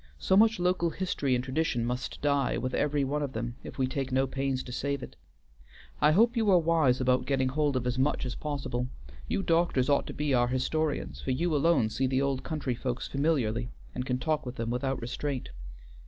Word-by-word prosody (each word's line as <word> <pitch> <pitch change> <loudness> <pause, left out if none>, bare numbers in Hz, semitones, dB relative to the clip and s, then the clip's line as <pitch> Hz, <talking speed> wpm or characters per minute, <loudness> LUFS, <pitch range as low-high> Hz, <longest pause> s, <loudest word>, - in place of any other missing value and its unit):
So 190 - +2
much 220 +1 +5
local 180 -1 +2
history 160 -7 -1
and 125 - -1
tradition 130 -3 0
must 125 +4 -4
die 140 -2 +2
with 130 0 -3
every 145 -1 +1
one 145 +2 -1
of 140 -2 -3
them 120 +2 -4
if - - -9
we 130 - +2
take 130 0 -3
no 130 +1 +3
pains 135 0 -2
to 125 - -9
save 140 +2 -2
it. - - -9 0.9
I 150 - +6
hope 230 +8 +4
you 220 -3 +2
are 185 - +7
wise 160 -6 +3
about 125 -1 +2
getting 130 -1 +1
hold 145 0 +1
of 125 -1 -1
as 125 +1 -1
much 135 0 +1
as 125 - -3
possible. 135 -4 -3 0.4
You 195 - -1
doctors 165 -7 +2
ought 140 - +2
to - - -5
be 150 -2 0
our 120 -1 +3
historians, 130 - -1
for - - -5
you 155 +5 +1
alone 145 -6 +3
see 130 +3 0
the 130 0 +1
old 135 -2 0
country 150 -6 -2
folks 125 +1 -3
familiarly 125 -6 0 0.2
and 125 - -3
can 125 -1 -1
talk 155 +2 -1
with 125 0 -6
them 115 -1 -3
without 135 +2 -1
restraint." 130 - -4
135 Hz, 215 wpm, -29 LUFS, 125-150 Hz, 0.9 s, are